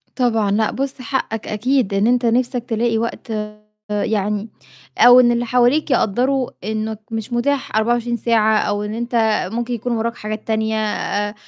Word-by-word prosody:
طبعًا. 225 -5 +1
لأ 215 +1 +1
بُص، 275 0 -4
حقك 230 -3 -3
أكيد 240 0 0
إن 200 +2 +2
أنت 245 0 +2
نَفْسك 245 +1 +1
تلاقي 230 0 0
وقت 230 0 -4 0.6
يعني 210 0 -1 0.5
أو 245 +1 +8
إن 240 -1 +5
اللي 240 0 0
حواليك 250 +5 +2
يقدّروا 255 +3 +1
إنّك 215 +1 -3
مش 225 +1 -4
متاح 265 0 -1
24 235 +2 +1
ساعة 220 -1 +2
أو 205 0 -1
إن 210 0 -4
أنت 235 +2 -4 0.4
ممكن 240 +1 -2
يكون 240 +1 -3
وراك 230 +1 -2
حاجات 215 -1 -6
تانية. 220 0 0
آآ 205 -1 -2
230 Hz, 155 wpm, -19 LUFS, 215-245 Hz, 0.6 s, أو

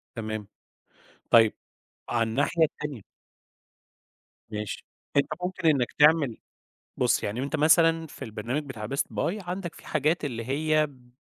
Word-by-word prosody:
تمام، 110 -2 -4 0.8
طيب 115 -2 +7 0.6
على 115 -2 +1
الناحية 145 +7 +1
التانية 150 -6 -5 1.5
ماشي، 105 -1 -5 0.3
أنت 140 -1 +4 0.2
ممكن 180 -2 -1
إنّك 135 -5 +2
تعمل 150 -5 +5 0.6
بُصّ - - +2
يعني 110 +5 -2
وأنت 140 +3 -2
مثلًا 165 +1 +4
في - - -8
البرنامج 115 +7 -3
بتاع 115 -7 -6
best 140 +4 0
buy 205 +3 -1
عندك 180 -1 -4
في - - -14
حاجات 155 +2 +1
اللي 115 -5 -4
هي 155 +3 +2
ب 125 -3 -20
140 Hz, 135 wpm, -27 LUFS, 115-155 Hz, 1.5 s, طيب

